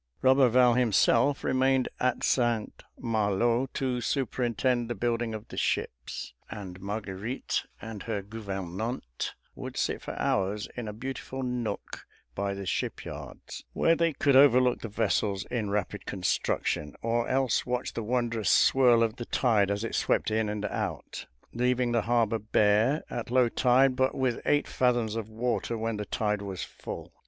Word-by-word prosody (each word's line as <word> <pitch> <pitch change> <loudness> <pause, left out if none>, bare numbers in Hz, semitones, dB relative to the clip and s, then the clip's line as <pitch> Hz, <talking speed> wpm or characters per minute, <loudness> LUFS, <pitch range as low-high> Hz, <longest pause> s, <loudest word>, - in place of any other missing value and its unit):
Roberval 130 -2 +5
himself 120 +3 +3
remained 130 0 +2
at 125 -1 0
St. 120 -4 +1 0.2
Malo 115 +3 +1
to 125 -2 -1
superintend 120 -2 0
the 120 - -2
building 120 -1 -1
of 110 - -9
the - - -9
ships, - - -2 0.2
and 95 -3 -7
Marguerite 105 +3 -3
and 110 -3 -7
her 105 -4 -3
gouvernante 100 - -5 0.2
would - - -7
sit - - -1
for - - -6
hours 100 +2 0
in 120 -3 -5
a - - -3
beautiful 130 +3 -5
nook 125 -2 -4 0.3
by 100 0 -2
the 100 0 -6
shipyards, - - -5
where 165 - +3
they 165 0 +2
could 140 -1 +2
overlook 130 -2 +6
the - - -4
vessels 100 -1 0
in 115 -5 -1
rapid 100 -2 -2
construction, 90 -5 -1
or 115 +1 +1
else 130 -3 +1
watch 125 0 -2
the - - -3
wondrous 115 -1 0
swirl 125 -3 +5
of 110 -1 -1
the 120 - -5
tide 110 -7 +2
as 100 +1 -1
it 115 - -4
swept - - +1
in 110 -1 +1
and 105 0 -3
out, - - -4 0.3
leaving 125 0 +1
the 115 -1 +2
harbor 115 -1 +1
bare 110 +6 +2
at 120 - -4
low 125 0 +4
tide, 130 +2 +3
but 130 +1 +1
with 130 -3 0
eight 145 0 +3
fathoms 120 -4 +1
of 110 -1 -4
water 115 +1 -1
when 115 0 -2
the 105 - -4
tide 105 -1 -1
was 95 -3 -5
full. - - -8
115 Hz, 155 wpm, -28 LUFS, 105-125 Hz, 0.3 s, overlook